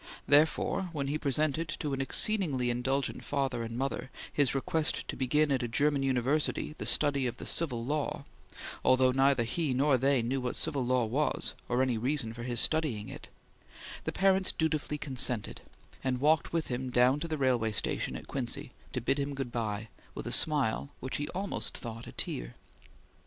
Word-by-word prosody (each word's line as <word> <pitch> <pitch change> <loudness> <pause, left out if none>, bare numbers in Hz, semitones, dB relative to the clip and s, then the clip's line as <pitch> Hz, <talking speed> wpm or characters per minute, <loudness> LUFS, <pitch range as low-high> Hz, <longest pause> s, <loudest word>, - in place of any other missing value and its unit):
Therefore, 175 +7 +3
when 140 -3 -2
he 150 +2 -1
presented 155 +3 0
to 145 -2 -2
an 135 - -1
exceedingly 135 - +2
indulgent 130 +3 -1
father 135 -4 -1
and 115 0 -5
mother 135 0 -3 0.2
his 140 -3 +2
request 150 +3 -1
to - - -3
begin 150 +3 +1
at 135 -1 +1
a 120 - -2
German 140 +4 +1
university 135 +4 0
the - - -2
study 140 -3 +4
of 120 - -5
the - - -8
Civil 125 -8 0
Law 150 +2 -2 0.6
although 130 0 +4
neither 135 -1 +3
he 135 +3 -1
nor 135 0 +3
they 135 -1 +2
knew 130 +3 -1
what 125 -1 -2
the - - +3
Civil 145 -5 +1
Law 125 -2 +2
was, 140 +7 -1 0.2
or 125 +1 +2
any 125 -4 0
reason 125 -2 -1
for 120 - -9
his 120 -1 +1
studying 135 -11 +2
it - - -9 0.8
the - - -1
parents 190 0 +2
dutifully 155 -2 -1
consented, 125 -6 +1 0.4
and 130 -1 -1
walked 155 +3 +2
with 165 -1 -2
him 125 +1 -3
down 125 +3 +3
to 165 - -4
the 155 -1 -3
railway 125 -5 +1
station 105 - -1
at - - -8
Quincy 125 -1 -3 0.2
to 125 - -2
bid 135 +5 0
him 140 0 -2
good 135 -3 -4
bye, 110 -2 -3 0.3
with - - -6
a - - -4
smile 140 -4 +4
which 130 - -3
he 145 - -3
almost 190 +4 -3
thought 115 -1 -7
a - - -8
tear. - - -5
135 Hz, 185 wpm, -30 LUFS, 125-150 Hz, 0.8 s, study